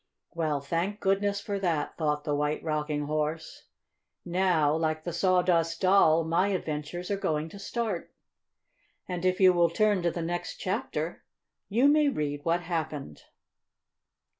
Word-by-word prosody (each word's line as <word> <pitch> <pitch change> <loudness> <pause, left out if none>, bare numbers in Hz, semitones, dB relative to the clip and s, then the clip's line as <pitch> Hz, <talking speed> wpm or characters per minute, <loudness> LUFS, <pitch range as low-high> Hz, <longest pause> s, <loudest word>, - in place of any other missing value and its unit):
"Well, 155 -4 -1
thank 170 +8 -2
goodness 200 0 +1
for 200 -1 -3
that!" 170 -6 -1
thought 150 -2 -1
the 150 - -1
White 150 +1 -1
Rocking 150 -1 -1
Horse. 155 +2 -3 0.6
"Now 175 -4 +2
like 155 -1 -1
the 175 - -4
Sawdust 175 -2 +2
Doll, 185 -4 +5
my 170 +4 +1
adventures 175 -1 -3
are 200 - +1
going 155 -4 -1
to 200 - -11
start." 215 -3 -3 1.0
And, 180 -1 -4
if 185 0 +2
you 185 -2 +7
will 170 -1 +3
turn 210 -3 +2
to 175 - +1
the 170 0 -4
next 175 - -4
chapter, - - -3 0.5
you 235 +7 +4
may 295 0 +4
read 145 - -3
what 170 +2 +1
happened. 155 - -4
170 Hz, 145 wpm, -28 LUFS, 155-190 Hz, 1.0 s, you